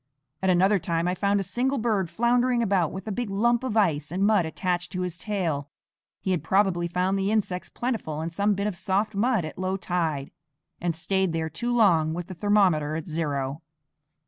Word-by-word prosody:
At 190 - +1
another 190 +3 +4
time 170 0 -1
I 180 - +1
found 200 +2 +1
a - - -1
single 260 +7 -1
bird 215 -7 0
floundering 240 +2 +2
about 190 -7 +1
with 190 +3 -7
a - - -2
big 235 +2 -3
lump 235 +5 +2
of 225 -4 -1
ice 155 -8 +2
and 190 +3 +1
mud 205 -6 +3
attached 175 +1 -2
to 185 - -2
his 175 -2 -3
tail. 165 -9 -2 0.5
He 190 - -2
had 175 -4 +1
probably 185 -1 +2
found 185 +3 0
the 195 +1 0
insects 200 -4 -1
plentiful 225 -11 -3
in 165 - -4
some 200 +4 +1
bit 200 +1 -2
of 210 -3 -1
soft 205 +4 0
mud 215 -2 +1
at 155 - -8
low 185 +1 -1
tide, 165 -7 -2 0.5
and 175 -2 -1
stayed 190 +1 0
there 160 -1 -2
too 240 +10 -2
long 170 -9 +3
with 175 0 -4
the 185 - -8
thermometer 180 -6 +2
at 160 +1 -5
zero. 145 -3 -2
185 Hz, 200 wpm, -26 LUFS, 165-210 Hz, 0.5 s, another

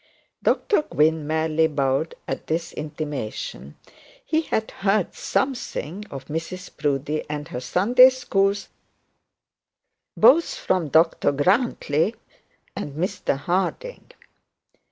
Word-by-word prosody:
Dr 410 - +2
Gwynne 160 - +1
merely 160 0 +2
bowed 140 +1 0
at - - -4
this 165 +1 -2
intimation. 150 -6 -5 0.5
He 315 -9 +1
had 220 -8 -2 0.4
something 210 - -2
of 135 -1 -8
Mrs 165 +4 -6
Proudie 150 0 -1
and 150 +1 -5
her 125 - -4
Sunday 225 - +6
schools, 200 -6 0 1.5
both 330 +4 +5
from 180 -4 0
Dr 160 -1 +3
Grantly 180 - +1 0.6
and 145 - -5
Mr 180 -3 -1
Harding. 185 - -2
160 Hz, 95 wpm, -23 LUFS, 150-200 Hz, 1.5 s, Sunday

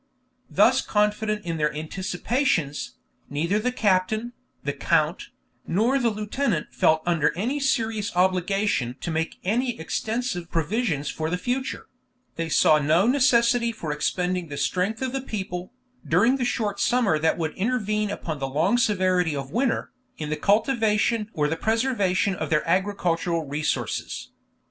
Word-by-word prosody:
Thus 255 +6 +4
confident 210 0 0
in 165 -1 -2
their 150 -1 +1
anticipations, 180 - -1 0.3
neither 170 +8 0
the 250 +4 0
captain, 215 +1 +1 0.3
the - - -1
count, - - +1 0.4
nor 230 +10 +2
the 240 -2 +2
lieutenant 210 - -2
felt 160 0 +3
under 165 -4 +2
any 250 +10 -1
serious 225 -6 0
obligation 185 - +1
to 170 - -4
make 160 +1 -2
any 240 +5 0
extensive 215 +1 -3
provisions 165 - -1
for 160 0 -3
the 180 - -1
future; 255 +6 -3 0.5
they 165 -1 -3
saw 155 0 +5
no 155 +6 +3
necessity 240 -2 +3
for 170 -9 -5
expending 180 +4 -1
the 145 -1 -6
strength 185 - -1
of 260 - -1
the 270 0 -2
people, 190 -7 -5 0.3
during 225 +11 +3
the 250 - -1
short 210 -4 -1
summer 235 -11 +2
that 160 +1 +1
would 160 -3 -2
intervene 215 -1 0
upon 160 -6 -4
the 135 - -2
long 165 - +2
severity 185 -7 +2
of 135 -1 -5
winter, 240 +3 0 0.3
in 150 -1 -4
the - - +1
cultivation 215 - +2
or 150 -1 +1
the 160 - -1
preservation 210 -2 +1
of - - -4
their 155 0 +1
agricultural 175 -3 0
resources. 150 +2 -3
195 Hz, 145 wpm, -25 LUFS, 165-230 Hz, 0.5 s, saw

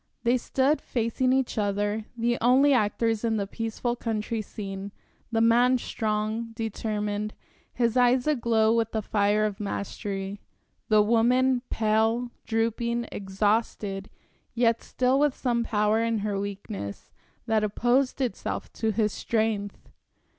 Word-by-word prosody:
They 240 +1 +3
stood 270 +4 +1
facing 240 +2 0
each 260 -4 +1
other, 205 +1 -1
the 240 +1 0
only 265 +4 +5
actors 225 -1 +1
in 225 -1 +1
the 200 - -1
peaceful 225 +3 -3
country 225 -1 -2
scene; 195 -1 -7 0.4
the 225 -1 +1
man 240 +3 +5
strong, 220 0 -2
determined, 210 -2 -3 0.4
his 235 -1 0
eyes 250 0 +4
aglow 230 -6 +2
with 230 -1 0
the 220 -1 -1
fire 210 +1 +2
of 210 -1 -3
mastery; 200 -1 -4 0.5
the 215 -1 +5
woman 245 +3 +3
pale, 225 +2 +1 0.2
drooping, 235 +1 -1
exhausted, 200 0 -1 0.5
yet 230 -1 +2
still 255 +1 +1
with 295 -2 +2
some 240 -2 0
power 215 0 +1
in 230 0 +1
her 205 -2 -1
weakness, 200 - -6 0.3
that 220 -1 +1
opposed 245 +6 +1
itself 245 -7 -3
to 220 - -1
his 210 0 0
strength. 215 -3 -2
225 Hz, 130 wpm, -27 LUFS, 210-240 Hz, 0.5 s, only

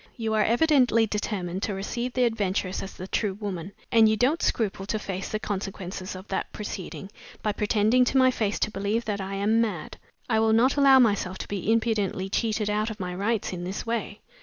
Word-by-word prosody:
You 225 -2 -1
are 215 -1 +3
evidently 245 -3 +4
determined 195 -4 -3
to 205 -2 -2
receive 235 +6 -3
the 250 -1 +3
adventuress 200 -4 -1
as 195 - -7
the 185 - -7
true 200 -1 -1
woman; 195 -3 -5 0.2
and 225 -1 +6
you 220 - +2
don't 275 +9 +2
scruple 195 -3 -1
to 215 - 0
face 195 -3 -5
the 215 - -2
consequences 190 -2 -5
of 185 +2 -9
that 190 - -2
proceeding, 200 -1 -6 0.3
by 210 - +1
pretending 215 +4 +3
to 265 - +1
my 260 -1 +6
face 210 -4 -1
to - - +1
believe 210 +4 -1
that 205 -2 -2
I 195 +1 -4
am 215 +3 +2
mad. 195 -9 -3 0.3
I 220 -3 +2
will 220 0 +3
not 245 +4 +4
allow 275 -2 +7
myself 200 -6 +2
to - - -6
be 200 +1 -1
impudently 215 -4 0
cheated 215 0 0
out 210 +1 0
of 220 -1 -7
my 180 -1 -3
rights 205 +2 -1
in 175 -1 -5
this 185 +2 -4
way. 225 -3 -3
210 Hz, 210 wpm, -26 LUFS, 195-230 Hz, 0.3 s, allow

